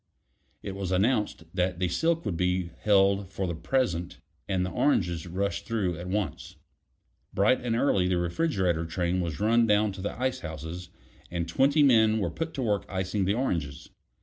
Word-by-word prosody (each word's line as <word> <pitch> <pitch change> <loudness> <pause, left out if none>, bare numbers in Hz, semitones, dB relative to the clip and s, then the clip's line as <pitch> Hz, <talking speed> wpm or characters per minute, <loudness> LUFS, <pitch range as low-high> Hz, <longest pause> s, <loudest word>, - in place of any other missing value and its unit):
It - - -4
was 95 -2 -4
announced 105 0 +1
that 90 -1 0
the 90 0 0
silk 165 - 0
would 100 -5 -1
be 90 0 0
held 100 -1 +3
for 95 0 -3
the 85 - -2
present 85 -2 -1 0.3
and 95 -2 +1
the 95 - -4
oranges 90 - +1
rushed 95 +2 -2
through 100 -7 -1
at 90 - -6
once. 100 +1 -3 0.8
Bright 105 +7 +3
and 120 -2 -1
early 100 -7 +2
the 90 -1 +1
refrigerator 85 - 0
train 90 +2 -1
was 85 -3 -4
run 115 +2 +3
down 105 0 +3
to 95 0 -8
the 105 - -4
icehouses, 90 -9 -4 0.4
and 85 -1 -3
twenty 140 - +3
men 110 -5 +5
were 100 -6 -1
put 165 0 -4
to 135 - -2
work 105 -4 0
icing 95 +1 -1
the 100 +2 +1
oranges. 80 - -2
95 Hz, 175 wpm, -27 LUFS, 90-110 Hz, 0.8 s, men